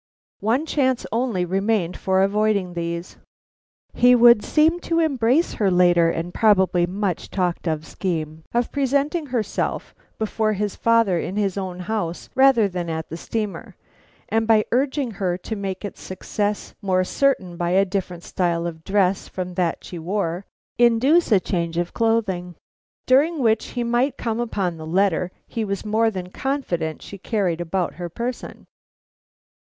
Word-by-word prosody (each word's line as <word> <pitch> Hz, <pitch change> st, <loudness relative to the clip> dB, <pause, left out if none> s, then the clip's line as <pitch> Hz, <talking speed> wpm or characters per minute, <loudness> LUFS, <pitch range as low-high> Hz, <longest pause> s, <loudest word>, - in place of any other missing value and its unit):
One 240 Hz, +9 st, +1 dB
chance 260 Hz, -5 st, 0 dB
only 230 Hz, -6 st, 0 dB
remained 195 Hz, -1 st, 0 dB
for 190 Hz, 0 st, +1 dB
avoiding 200 Hz, -2 st, +1 dB
these. 170 Hz, +1 st, -4 dB, 0.8 s
He 245 Hz, +1 st, +5 dB
would 235 Hz, -2 st, +7 dB
seem 320 Hz, +3 st, +3 dB
to 335 Hz, -1 st, -1 dB
embrace 280 Hz, 0 st, +2 dB
her 200 Hz, -, +4 dB
later 175 Hz, -2 st, +4 dB
and 165 Hz, +1 st, -3 dB
probably 190 Hz, -5 st, +3 dB
much 190 Hz, -1 st, -3 dB
talked 180 Hz, -2 st, -1 dB
of 155 Hz, -1 st, -1 dB
scheme 160 Hz, -4 st, -4 dB
of 240 Hz, 0 st, 0 dB
presenting 285 Hz, +3 st, 0 dB
herself 235 Hz, -5 st, -2 dB, 0.2 s
before 220 Hz, 0 st, 0 dB
his 205 Hz, 0 st, -2 dB
father 230 Hz, -6 st, +3 dB
in 185 Hz, -, -4 dB
his 200 Hz, -3 st, 0 dB
own 185 Hz, -2 st, -4 dB
house 180 Hz, -3 st, -3 dB
rather 265 Hz, -5 st, +5 dB
than 180 Hz, -3 st, -4 dB
at 160 Hz, -1 st, -4 dB
the 165 Hz, -, -5 dB
steamer; 210 Hz, +4 st, -4 dB, 0.5 s
and 225 Hz, 0 st, 0 dB
by 220 Hz, -2 st, +4 dB
urging 265 Hz, 0 st, 0 dB
her 185 Hz, -4 st, -2 dB
to 220 Hz, +4 st, -5 dB
make 195 Hz, -1 st, -4 dB
its 205 Hz, -, -8 dB
success 205 Hz, +2 st, -3 dB
more 185 Hz, -2 st, +1 dB
certain 190 Hz, -5 st, 0 dB
by 175 Hz, 0 st, -1 dB
a 190 Hz, +2 st, +4 dB
different 180 Hz, -3 st, -4 dB
style 170 Hz, -2 st, -1 dB
of 160 Hz, -2 st, -6 dB
dress 195 Hz, 0 st, +1 dB
from 180 Hz, -1 st, -5 dB
that 175 Hz, -2 st, -1 dB
she 175 Hz, -, -8 dB
wore, 180 Hz, +1 st, -2 dB, 0.3 s
induce 245 Hz, +7 st, +4 dB
a 205 Hz, -, +6 dB
change 170 Hz, -3 st, -2 dB
of 175 Hz, 0 st, -2 dB
clothing, 210 Hz, -6 st, 0 dB, 0.5 s
during 295 Hz, +6 st, +3 dB
which 225 Hz, -5 st, +2 dB
he 240 Hz, -, +1 dB
might 240 Hz, +3 st, +1 dB
come 225 Hz, -1 st, -2 dB
upon 195 Hz, -7 st, -2 dB
the 160 Hz, 0 st, -8 dB
letter 180 Hz, 0 st, +1 dB, 0.2 s
he 225 Hz, -, -3 dB
was 200 Hz, 0 st, -3 dB
more 220 Hz, +2 st, +2 dB
than 185 Hz, -3 st, -6 dB
confident 180 Hz, -, -3 dB
she 200 Hz, -, -10 dB
carried 185 Hz, -6 st, -1 dB
about 175 Hz, +1 st, -1 dB
her 175 Hz, -, -4 dB
person. 240 Hz, +8 st, -6 dB
200 Hz, 160 wpm, -22 LUFS, 180-230 Hz, 0.8 s, would